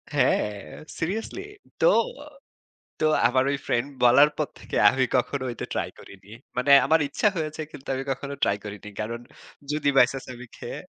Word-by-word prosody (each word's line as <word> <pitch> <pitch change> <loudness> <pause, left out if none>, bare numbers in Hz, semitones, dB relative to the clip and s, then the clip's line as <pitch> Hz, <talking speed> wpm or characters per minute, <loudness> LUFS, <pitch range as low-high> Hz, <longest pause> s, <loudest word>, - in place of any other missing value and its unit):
হ্যাঁ 105 - +2 0.5
সিরিয়াসলি। 220 - -3 0.4
তো, - - +6 1.1
তো 155 - +3 0.2
আমার 130 +1 +2
ঐ - - 0
ফ্রেন্ড 120 +4 0 0.2
বলার 140 +5 +7
পর 150 - 0
থেকে - - -6
আমি 130 -1 +1
কখনো 130 +2 -1
ওইটা 120 - -6
ট্রাই - - -2
করিনি। 100 +1 -15 0.3
মানে 140 +3 +3
আমার 160 0 +4
ইচ্ছা 210 - +2
হয়েছে 155 -1 -3
কিন্তু 135 - -12
আমি 135 +1 -3
কখনো 140 +2 -6
ট্রাই 100 - +2
করিনি। 105 0 -8
কারণ 115 +2 -4 0.5
যদি 150 -1 0
বাই 125 - +8
চান্স 135 -1 -7
আমি 125 +1 -10
খেয়ে - - -7
135 Hz, 165 wpm, -25 LUFS, 120-150 Hz, 1.1 s, বাই